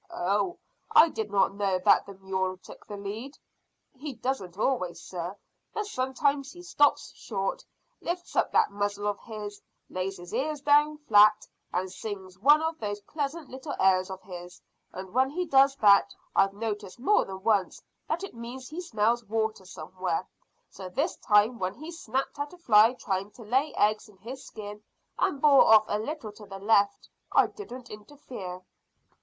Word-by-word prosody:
"Oh, 205 Hz, -, 0 dB, 0.3 s
I 330 Hz, -, +7 dB
did 220 Hz, -7 st, -4 dB
not 195 Hz, -1 st, +2 dB
know 200 Hz, -2 st, 0 dB
that 185 Hz, -, +4 dB
the 200 Hz, -, -9 dB
mule 190 Hz, -1 st, -2 dB
took -, -, -14 dB
the 205 Hz, -, -6 dB
lead." 215 Hz, +8 st, -6 dB, 0.6 s
"He 280 Hz, +2 st, -6 dB
doesn't 215 Hz, -7 st, -3 dB
always, 210 Hz, -7 st, 0 dB
sir, 180 Hz, +2 st, -6 dB, 0.4 s
but 425 Hz, -, -1 dB
sometimes 275 Hz, -3 st, 0 dB
he 350 Hz, 0 st, -12 dB
stops 290 Hz, -4 st, +2 dB
short, 195 Hz, -3 st, -3 dB, 0.4 s
lifts 350 Hz, +1 st, -4 dB
up -, -, +2 dB
that -, -, +3 dB
muzzle 205 Hz, 0 st, -2 dB
of 205 Hz, -1 st, -1 dB
his, 210 Hz, -2 st, -8 dB, 0.3 s
lays 190 Hz, +1 st, -3 dB
his 175 Hz, 0 st, -11 dB
ears 300 Hz, +2 st, -1 dB
flat 295 Hz, +1 st, +4 dB, 0.2 s
down, 210 Hz, 0 st, +9 dB, 0.4 s
and 185 Hz, +1 st, -2 dB
sings 190 Hz, -2 st, -7 dB
one 295 Hz, +7 st, +6 dB
of 320 Hz, 0 st, -2 dB
those 205 Hz, -1 st, -3 dB
pleasant 295 Hz, +4 st, -4 dB
little 265 Hz, +3 st, -6 dB
airs 185 Hz, -1 st, +3 dB
of 190 Hz, 0 st, -8 dB
his; 180 Hz, -1 st, -9 dB, 0.3 s
and 190 Hz, +1 st, -8 dB
when 260 Hz, +2 st, +3 dB
he 360 Hz, +5 st, -2 dB
does 275 Hz, -2 st, +5 dB
that 200 Hz, -4 st, +5 dB, 0.2 s
I've 195 Hz, 0 st, +4 dB
noticed 210 Hz, -1 st, -4 dB
more 415 Hz, -, +3 dB
than 190 Hz, 0 st, -8 dB
once 205 Hz, -4 st, +1 dB, 0.3 s
that 335 Hz, +4 st, -2 dB
it 390 Hz, -, -6 dB
means 240 Hz, +2 st, -8 dB
he 320 Hz, +4 st, -5 dB
smells 235 Hz, -5 st, +1 dB
water 220 Hz, -2 st, -2 dB
somewhere. 185 Hz, -1 st, -4 dB, 0.4 s
So 190 Hz, -1 st, -8 dB
this 290 Hz, -, -1 dB
time 215 Hz, +2 st, +3 dB
when 185 Hz, +1 st, -2 dB
he 310 Hz, +7 st, -8 dB
snapped 270 Hz, -3 st, -3 dB
at 290 Hz, +2 st, -4 dB
a -, -, -12 dB
fly 225 Hz, -7 st, +5 dB
trying 195 Hz, -4 st, -2 dB
to 235 Hz, -, -12 dB
lay 265 Hz, +7 st, +1 dB
eggs 215 Hz, +1 st, +1 dB
in 200 Hz, -, -19 dB
his 245 Hz, +7 st, -8 dB
skin, 210 Hz, -1 st, -9 dB, 0.4 s
and 280 Hz, -, +1 dB
bore 280 Hz, -1 st, +7 dB
off 215 Hz, -1 st, +8 dB
a 210 Hz, -, -1 dB
little 275 Hz, -1 st, -5 dB
to 210 Hz, 0 st, -14 dB
the 195 Hz, -, -8 dB
left, 200 Hz, 0 st, +2 dB, 0.2 s
I -, -, +5 dB
didn't 255 Hz, -, -9 dB
interfere." 210 Hz, -5 st, -9 dB
215 Hz, 175 wpm, -28 LUFS, 195-275 Hz, 0.6 s, down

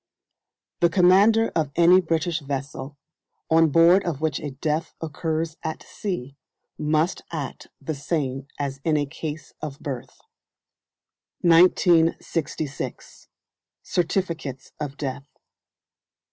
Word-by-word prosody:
The 170 Hz, -, +4 dB
commander 200 Hz, +5 st, +5 dB
of 155 Hz, -3 st, -1 dB
any 175 Hz, +2 st, +6 dB
British 165 Hz, 0 st, 0 dB
vessel, 140 Hz, 0 st, -5 dB, 0.5 s
on 165 Hz, 0 st, +5 dB
board 170 Hz, +5 st, +6 dB
of 165 Hz, -6 st, -3 dB
which 155 Hz, -2 st, -1 dB
a 150 Hz, -, -4 dB
death 150 Hz, +4 st, -2 dB
occurs 160 Hz, 0 st, -3 dB
at 160 Hz, 0 st, -5 dB
sea, 160 Hz, -, -5 dB, 0.4 s
must 155 Hz, +3 st, 0 dB
act 150 Hz, -5 st, -5 dB
the 150 Hz, +3 st, -4 dB
same 140 Hz, -2 st, -2 dB
as 140 Hz, -1 st, -3 dB
in 155 Hz, -2 st, +2 dB
a 145 Hz, -, +1 dB
case 155 Hz, +1 st, -7 dB
of 145 Hz, -2 st, -6 dB
birth. 130 Hz, -2 st, -6 dB, 1.2 s
1966. 165 Hz, -3 st, +2 dB, 0.6 s
Certificates 165 Hz, -6 st, -2 dB
of 145 Hz, -2 st, -5 dB
Death. 140 Hz, 0 st, -4 dB
155 Hz, 105 wpm, -24 LUFS, 140-170 Hz, 1.2 s, any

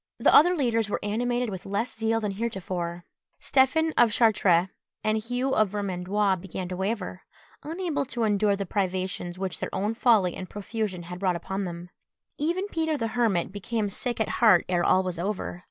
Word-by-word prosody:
The -, -, +4 dB
other 350 Hz, +4 st, +7 dB
leaders 230 Hz, -7 st, +1 dB
were -, -, -1 dB
animated 240 Hz, +3 st, 0 dB
with 190 Hz, -1 st, -6 dB
less 215 Hz, +5 st, -2 dB
zeal 225 Hz, 0 st, +1 dB
than 210 Hz, -2 st, -2 dB
heretofore. 185 Hz, -5 st, -4 dB, 0.3 s
Stephen 315 Hz, +5 st, +2 dB
of 235 Hz, -2 st, +5 dB
Chartres 200 Hz, -6 st, +3 dB, 0.3 s
and 215 Hz, 0 st, +1 dB
Hugh 245 Hz, +4 st, -2 dB
of 215 Hz, -2 st, +3 dB
Vermandois 195 Hz, 0 st, 0 dB
began 185 Hz, 0 st, -6 dB
to 180 Hz, -, -4 dB
waver, 190 Hz, -1 st, -3 dB, 0.4 s
unable 320 Hz, -3 st, -2 dB
to 240 Hz, -2 st, -2 dB
endure 205 Hz, -1 st, +2 dB
the 200 Hz, 0 st, -3 dB
privations 185 Hz, -2 st, -2 dB
which 190 Hz, 0 st, -3 dB
their -, -, -3 dB
own 210 Hz, +3 st, -1 dB
folly 220 Hz, -7 st, +3 dB
and 185 Hz, -, -7 dB
profusion 205 Hz, -3 st, -4 dB
had 180 Hz, +1 st, -8 dB
brought 185 Hz, -2 st, +1 dB
upon 190 Hz, +3 st, -3 dB
them. 175 Hz, 0 st, -7 dB, 0.5 s
Even 345 Hz, +7 st, 0 dB
Peter 320 Hz, -3 st, -1 dB
the 225 Hz, -4 st, -2 dB
Hermit 220 Hz, -8 st, +1 dB
became 205 Hz, +1 st, -2 dB
sick 240 Hz, +3 st, -3 dB
at 220 Hz, -, +1 dB
heart 210 Hz, -7 st, +6 dB
ere 175 Hz, -1 st, +1 dB
all 185 Hz, +2 st, +4 dB
was 180 Hz, -2 st, -4 dB
over. 185 Hz, -1 st, -3 dB
205 Hz, 180 wpm, -26 LUFS, 185-235 Hz, 0.5 s, other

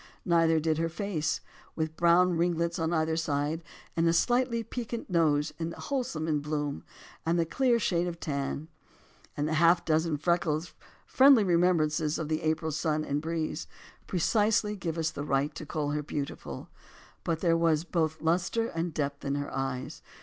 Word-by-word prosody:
Neither 165 Hz, -2 st, +4 dB
did 160 Hz, 0 st, 0 dB
her 165 Hz, 0 st, 0 dB
face 165 Hz, -4 st, -2 dB, 0.2 s
— -, -, -26 dB
with 160 Hz, 0 st, -2 dB
brown 175 Hz, +1 st, +4 dB
ringlets 170 Hz, 0 st, 0 dB
on 160 Hz, 0 st, 0 dB
either 160 Hz, -1 st, +1 dB
side 155 Hz, 0 st, -1 dB, 0.3 s
and 165 Hz, 0 st, +2 dB
a 165 Hz, -, +4 dB
slightly 240 Hz, +5 st, +2 dB
piquant 230 Hz, -2 st, -5 dB
nose, 150 Hz, -4 st, +2 dB
and 165 Hz, 0 st, -2 dB
the -, -, -10 dB
wholesome 160 Hz, -, -1 dB
bloom, 145 Hz, -1 st, -3 dB, 0.4 s
and 165 Hz, +1 st, +1 dB
the 170 Hz, -, +2 dB
clear 245 Hz, +8 st, +2 dB
shade 175 Hz, -5 st, 0 dB
of 170 Hz, -1 st, -5 dB
tan, 140 Hz, 0 st, -3 dB, 0.7 s
and 145 Hz, +1 st, 0 dB
the 155 Hz, -, -1 dB
half 170 Hz, +2 st, +4 dB
dozen 160 Hz, -1 st, +1 dB
freckles, 165 Hz, 0 st, 0 dB, 0.3 s
friendly 265 Hz, -4 st, +6 dB
remembrances 170 Hz, -4 st, +2 dB
of 155 Hz, -2 st, -4 dB
the 155 Hz, 0 st, 0 dB
April 160 Hz, 0 st, 0 dB
sun 155 Hz, 0 st, -1 dB
and 145 Hz, +1 st, -1 dB
breeze 160 Hz, 0 st, -3 dB, 0.2 s
— -, -, -23 dB
precisely 210 Hz, +3 st, +2 dB
give 170 Hz, -4 st, -4 dB
us 160 Hz, -1 st, 0 dB
the 145 Hz, -, -5 dB
right 145 Hz, +1 st, 0 dB
to 155 Hz, -, -8 dB
call 145 Hz, -1 st, -2 dB
her 150 Hz, 0 st, -1 dB
beautiful. 145 Hz, -1 st, -5 dB, 0.5 s
But 165 Hz, -1 st, -1 dB
there 170 Hz, -2 st, +3 dB
was 165 Hz, -2 st, +2 dB
both 160 Hz, -3 st, -1 dB
lustre 185 Hz, +8 st, +1 dB
and 165 Hz, 0 st, -3 dB
depth 140 Hz, -1 st, -2 dB
in 140 Hz, 0 st, -1 dB
her 145 Hz, 0 st, -4 dB
eyes. 135 Hz, -1 st, -3 dB
165 Hz, 175 wpm, -29 LUFS, 155-175 Hz, 0.7 s, friendly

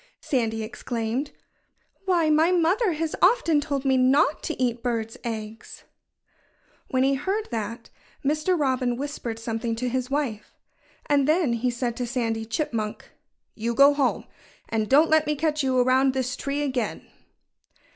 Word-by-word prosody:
Sandy 225 Hz, -4 st, -1 dB
exclaimed. 235 Hz, +3 st, -3 dB, 0.8 s
"Why, 340 Hz, -5 st, +2 dB
my 315 Hz, +3 st, +4 dB
mother 360 Hz, +4 st, +2 dB
has 315 Hz, 0 st, -2 dB
often 360 Hz, -7 st, +4 dB
told 280 Hz, -2 st, -3 dB
me 265 Hz, -1 st, +3 dB
not 275 Hz, +4 st, +3 dB
to 320 Hz, -, -4 dB
eat 240 Hz, -2 st, 0 dB
birds' 230 Hz, -2 st, -2 dB
eggs." 225 Hz, -1 st, -7 dB, 1.0 s
When 260 Hz, 0 st, +1 dB
he 270 Hz, +1 st, +3 dB
heard 385 Hz, +10 st, -2 dB
that, 230 Hz, 0 st, -5 dB, 0.3 s
Mr. 310 Hz, +5 st, +1 dB
Robin 255 Hz, -3 st, 0 dB
whispered 270 Hz, -5 st, -4 dB
something 225 Hz, 0 st, -3 dB
to 250 Hz, +2 st, -2 dB
his 255 Hz, +1 st, -2 dB
wife. 270 Hz, -7 st, -3 dB, 0.5 s
And 285 Hz, -2 st, +2 dB
then 310 Hz, -5 st, +2 dB
he 235 Hz, +2 st, 0 dB
said 240 Hz, -1 st, -2 dB
to 245 Hz, -, -2 dB
Sandy 225 Hz, -3 st, -2 dB
Chipmunk: 225 Hz, -4 st, -3 dB, 0.4 s
"You 230 Hz, +1 st, -3 dB
go 280 Hz, +2 st, +7 dB
home! 280 Hz, -3 st, 0 dB, 0.4 s
And 220 Hz, -2 st, -1 dB
don't 300 Hz, +4 st, +5 dB
let 315 Hz, -1 st, +4 dB
me 300 Hz, -, +1 dB
catch 305 Hz, 0 st, 0 dB
you 260 Hz, -2 st, +1 dB
around 260 Hz, +1 st, +3 dB
this 255 Hz, -1 st, -1 dB
tree 280 Hz, +3 st, -2 dB
again!" 255 Hz, -6 st, -2 dB
260 Hz, 150 wpm, -25 LUFS, 235-300 Hz, 1.0 s, go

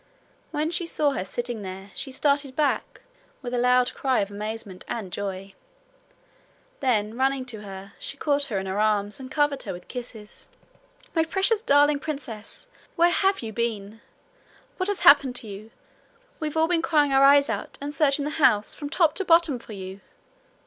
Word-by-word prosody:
When 310 Hz, +1 st, -1 dB
she 345 Hz, 0 st, -2 dB
saw 295 Hz, -3 st, +1 dB
her 225 Hz, -, -2 dB
sitting 240 Hz, +3 st, -4 dB
there 190 Hz, +1 st, -8 dB
she 270 Hz, -, -4 dB
started 280 Hz, 0 st, 0 dB
back 295 Hz, -1 st, -1 dB, 0.4 s
with 245 Hz, -1 st, -5 dB
a 245 Hz, -, +1 dB
loud 250 Hz, 0 st, +3 dB
cry 265 Hz, -2 st, +1 dB
of 200 Hz, 0 st, -3 dB
amazement 210 Hz, -2 st, -6 dB
and 205 Hz, -6 st, -5 dB
joy. 195 Hz, -1 st, -5 dB, 1.3 s
Then 220 Hz, -5 st, 0 dB
running 265 Hz, +1 st, 0 dB
to 225 Hz, -4 st, -6 dB
her, 195 Hz, -1 st, -9 dB
she 275 Hz, -, -6 dB
caught 285 Hz, -1 st, +1 dB
her 220 Hz, -8 st, -3 dB
in 190 Hz, -, -3 dB
her 190 Hz, +2 st, -2 dB
arms 210 Hz, 0 st, +1 dB
and 260 Hz, -1 st, -8 dB
covered 290 Hz, -1 st, +1 dB
her -, -, -5 dB
with 175 Hz, 0 st, -11 dB
kisses. 235 Hz, -4 st, -9 dB, 0.7 s
'My 325 Hz, -, +4 dB
precious 390 Hz, +6 st, +2 dB
darling 290 Hz, -4 st, +4 dB
princess! 265 Hz, -, -7 dB, 0.3 s
where 345 Hz, 0 st, +4 dB
have 385 Hz, -3 st, +1 dB
you 220 Hz, -1 st, -5 dB
been? 225 Hz, -2 st, -3 dB, 0.8 s
What 370 Hz, +1 st, -1 dB
has 405 Hz, -, -1 dB
happened 280 Hz, -3 st, +6 dB
to 235 Hz, -, -6 dB
you? 205 Hz, +2 st, -9 dB, 0.7 s
We've 310 Hz, 0 st, -3 dB
all 320 Hz, 0 st, +4 dB
been 345 Hz, -1 st, +1 dB
crying 295 Hz, -4 st, +2 dB
our 270 Hz, 0 st, +5 dB
eyes 280 Hz, +1 st, +6 dB
out, -, -, -4 dB
and 285 Hz, +1 st, -5 dB
searching 285 Hz, -1 st, +2 dB
the 300 Hz, -, -2 dB
house 215 Hz, -6 st, +4 dB
from 290 Hz, -2 st, -6 dB
top 320 Hz, -1 st, +3 dB
to 390 Hz, -, +1 dB
bottom 330 Hz, -7 st, +4 dB
for 225 Hz, -, -11 dB
you.' 190 Hz, 0 st, -8 dB
260 Hz, 180 wpm, -25 LUFS, 210-295 Hz, 1.3 s, happened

